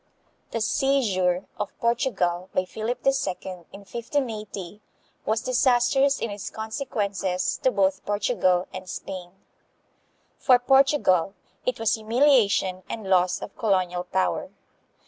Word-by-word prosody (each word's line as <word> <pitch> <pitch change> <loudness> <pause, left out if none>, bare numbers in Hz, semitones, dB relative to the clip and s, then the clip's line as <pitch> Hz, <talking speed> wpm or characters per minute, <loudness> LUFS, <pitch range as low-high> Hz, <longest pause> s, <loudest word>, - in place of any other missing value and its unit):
The 230 - -3
seizure 205 -8 +1
of 210 -1 -4
Portugal 195 -7 0
by 185 - +2
Philip 230 +5 -4
II. 270 - +6 0.6
in 200 - -11
1580 215 -4 -4 0.5
was 220 +1 +1
disastrous 255 +2 +3
in 230 - -3
its 205 -1 -5
consequences 210 -5 -2
to 260 - +4
both 190 -4 +1
Portugal 200 -3 +1
and 185 0 -7
Spain. 180 -2 -6 1.1
For 255 -2 +6
Portugal 250 - +3 0.3
it - - 0
was 225 -1 +2
humiliation 220 -5 +3
and 220 -4 -5
loss 180 -1 +3
of - - -9
colonial 185 -4 0
power. 185 +1 -1
210 Hz, 115 wpm, -25 LUFS, 185-245 Hz, 1.1 s, II